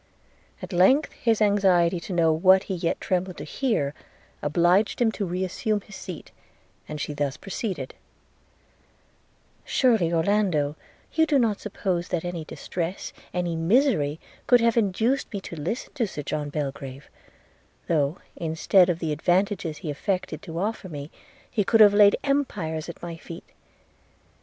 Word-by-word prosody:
At 185 +1 -6
length 225 - +4
his 225 -2 +1
anxiety 185 -4 +3
to 170 - -8
know 165 -3 +3
what 185 +4 +5
he 195 - -4
yet 170 -2 -1
trembled 185 0 -2
to 145 - -6
hear 150 - -1 0.5
obliged 175 +7 +2
him 235 -2 +3
to 205 -3 -3
re 180 +2 -2
assume 210 +3 -1
his 205 - -13
seat, 180 -5 -8 0.6
and 150 0 -5
she 150 - -3
thus 145 -1 -2
proceeded: 195 0 -4 1.7
'Surely, 225 -10 +2
Orlando, 165 -4 +1 0.4
you 320 0 +3
do 295 - +3
not 225 -5 +1
suppose 185 -4 -2
that 175 -2 -2
any 175 -2 -4
distress, 175 +3 -5 0.2
any 175 -2 -2
misery, 165 - +2 0.3
could 245 - +6
have 230 -1 +2
induced 230 +5 +1
me 205 - -3
to 170 - -8
listen 170 - -4
to 245 -6 0
Sir 150 -6 -6
John 150 0 -3
Belgrave, 140 -2 -5 0.8
though, 150 -1 +1 0.2
instead 170 +3 +3
of 175 - +1
the 165 -2 -2
advantages 175 +1 0
he 155 0 -4
affected 185 +6 -3
to 165 -5 -7
offer 200 +1 -3
me, 145 -1 -7 0.4
he 210 - +1
could 225 +3 +3
have 205 -2 +8
laid 205 -1 +6
empires 180 - -1
at 170 - -10
my 170 -1 -5
feet. 165 +1 -11
180 Hz, 150 wpm, -25 LUFS, 160-210 Hz, 1.7 s, have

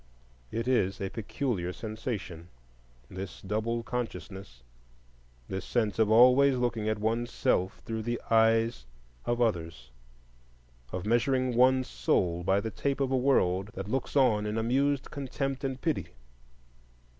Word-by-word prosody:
It 115 +1 -3
is 100 -7 +1
a 95 -1 -3
peculiar 110 -4 -2
sensation, 110 - -5 0.6
this 95 +2 -7
double 110 +4 -2
consciousness, 100 - -6 0.8
this 95 0 -4
sense 110 -3 -1
of 110 -2 +4
always 130 +4 +6
looking 115 -3 -1
at 110 - 0
one's 115 +3 -1
self 95 +1 0
through 115 -2 -3
the 120 +2 -2
eyes 115 - +3 0.4
of 120 0 0
others, 85 - -1 1.0
of 90 +1 -4
measuring 125 +2 +1
one's 130 +1 +4
soul 85 +8 0
by 95 +2 +2
the 110 +2 -4
tape 140 +4 -2
of 135 -1 0
a - - +3
world 95 -8 +2
that 95 +2 -5
looks 135 - -2
on 110 -7 +3
in 105 +1 -2
amused 135 +4 +1
contempt 135 0 -3
and 135 -1 -3
pity. 160 -3 -1
115 Hz, 135 wpm, -29 LUFS, 95-125 Hz, 1.0 s, always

